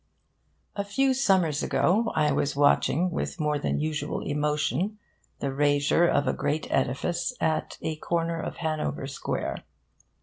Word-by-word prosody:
A 200 Hz, -, -1 dB
few 260 Hz, +7 st, +2 dB
summers 190 Hz, -, +2 dB
ago, 180 Hz, +12 st, +2 dB
I 150 Hz, -2 st, +3 dB
was 140 Hz, -1 st, 0 dB
watching, 145 Hz, +4 st, +3 dB
with 175 Hz, -, -3 dB
more 150 Hz, -1 st, 0 dB
than -, -, -1 dB
usual 150 Hz, -1 st, -2 dB
emotion, 150 Hz, +7 st, -1 dB, 0.4 s
the 140 Hz, -1 st, -1 dB
rasure 145 Hz, +4 st, +3 dB
of 145 Hz, -3 st, +2 dB
a -, -, +2 dB
great 150 Hz, +2 st, -1 dB
edifice 175 Hz, -, 0 dB
at 160 Hz, -1 st, -1 dB
a 160 Hz, -1 st, -2 dB
corner 165 Hz, +1 st, -1 dB
of -, -, -5 dB
Hanover 155 Hz, -4 st, -2 dB
Square. 135 Hz, 0 st, -4 dB
155 Hz, 140 wpm, -27 LUFS, 145-175 Hz, 0.4 s, I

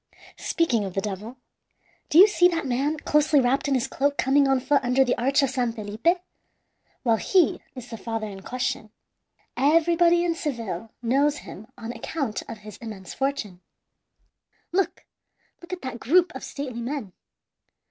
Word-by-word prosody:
Speaking 255 Hz, -11 st, +1 dB
of 190 Hz, -2 st, -6 dB
the -, -, +1 dB
devil 210 Hz, +5 st, -6 dB, 0.7 s
do 305 Hz, -, +3 dB
you 385 Hz, +4 st, +10 dB
see 355 Hz, -4 st, +5 dB
that 335 Hz, -3 st, -2 dB
man 275 Hz, +5 st, 0 dB
closely 300 Hz, 0 st, +3 dB
wrapped 265 Hz, +3 st, +1 dB
in 275 Hz, -, +2 dB
his 250 Hz, -, +1 dB
cloak 285 Hz, +1 st, 0 dB
coming 275 Hz, +1 st, +3 dB
on 270 Hz, -1 st, +3 dB
foot 275 Hz, +1 st, +2 dB
under 255 Hz, +2 st, +3 dB
the 250 Hz, -, +1 dB
arch 275 Hz, +4 st, +2 dB
of 270 Hz, -, +1 dB
San 250 Hz, -3 st, 0 dB
Felipe? 220 Hz, -, 0 dB, 0.9 s
Well, 230 Hz, -3 st, +3 dB
he 365 Hz, -, +2 dB
is 245 Hz, -1 st, -9 dB
the 225 Hz, -, -5 dB
father 225 Hz, -2 st, -3 dB
in 195 Hz, -2 st, -8 dB
question. 245 Hz, -1 st, -3 dB, 0.7 s
Everybody 335 Hz, +5 st, +4 dB
in 340 Hz, -, +1 dB
Seville 230 Hz, -, -4 dB
knows 280 Hz, +5 st, +2 dB
him 215 Hz, +3 st, -10 dB
on 230 Hz, 0 st, -6 dB
account 245 Hz, 0 st, -3 dB
of -, -, -6 dB
his 210 Hz, -2 st, -9 dB
immense 210 Hz, -5 st, -8 dB
fortune. 270 Hz, -10 st, -3 dB, 1.1 s
"Look 375 Hz, 0 st, -1 dB, 0.6 s
look 345 Hz, -, -12 dB
at 365 Hz, -4 st, -5 dB
that 260 Hz, -2 st, -5 dB
group 350 Hz, +8 st, +3 dB
of 260 Hz, -, -8 dB
stately 255 Hz, -4 st, -5 dB
men! 240 Hz, -6 st, -4 dB
265 Hz, 165 wpm, -25 LUFS, 225-300 Hz, 1.1 s, you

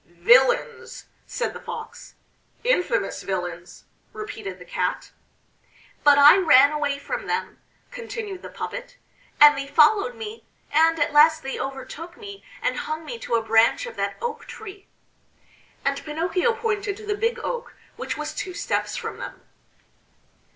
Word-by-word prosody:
"Villains!" 245 Hz, -, +2 dB, 0.2 s
said 485 Hz, -, -3 dB
the -, -, -8 dB
Fox. 455 Hz, -1 st, -9 dB, 0.5 s
"Infamous 485 Hz, -7 st, 0 dB
villains!" 180 Hz, -2 st, -5 dB, 0.3 s
repeated 220 Hz, -, -7 dB
the 180 Hz, -, -13 dB
Cat. -, -, -3 dB, 0.9 s
"But 290 Hz, -1 st, +6 dB
I 285 Hz, +4 st, +9 dB
ran 290 Hz, -6 st, +6 dB
away 290 Hz, -2 st, -1 dB
from 485 Hz, +13 st, -5 dB
them," 450 Hz, -, -3 dB, 0.3 s
continued 440 Hz, -5 st, -6 dB
the -, -, -9 dB
puppet, -, -, -7 dB, 0.4 s
"and 295 Hz, 0 st, +9 dB
they 275 Hz, 0 st, -4 dB
followed 405 Hz, -, +4 dB
me, 450 Hz, -1 st, -8 dB, 0.3 s
and 325 Hz, +2 st, +4 dB
at 290 Hz, -1 st, 0 dB
last 315 Hz, +1 st, +5 dB
they 270 Hz, -, -4 dB
overtook 290 Hz, +6 st, -7 dB
me 405 Hz, -2 st, -10 dB, 0.2 s
and -, -, 0 dB
hung 315 Hz, +1 st, -4 dB
me 240 Hz, -6 st, -6 dB
to 235 Hz, -, -2 dB
a 230 Hz, -, +1 dB
branch 225 Hz, -, +3 dB
of 475 Hz, -, -8 dB
that -, -, -2 dB
oak 475 Hz, -1 st, -4 dB
tree." 400 Hz, -3 st, -10 dB, 1.0 s
And 275 Hz, 0 st, -1 dB
Pinocchio 345 Hz, +8 st, 0 dB
pointed 420 Hz, -3 st, -2 dB
to 435 Hz, -, -11 dB
the 415 Hz, -, -1 dB
Big 460 Hz, +3 st, 0 dB
Oak, 485 Hz, -1 st, -4 dB, 0.2 s
which -, -, -5 dB
was -, -, -4 dB
two 365 Hz, -2 st, -5 dB
steps -, -, -2 dB
from -, -, -5 dB
them. -, -, -8 dB
330 Hz, 150 wpm, -24 LUFS, 275-440 Hz, 1.0 s, I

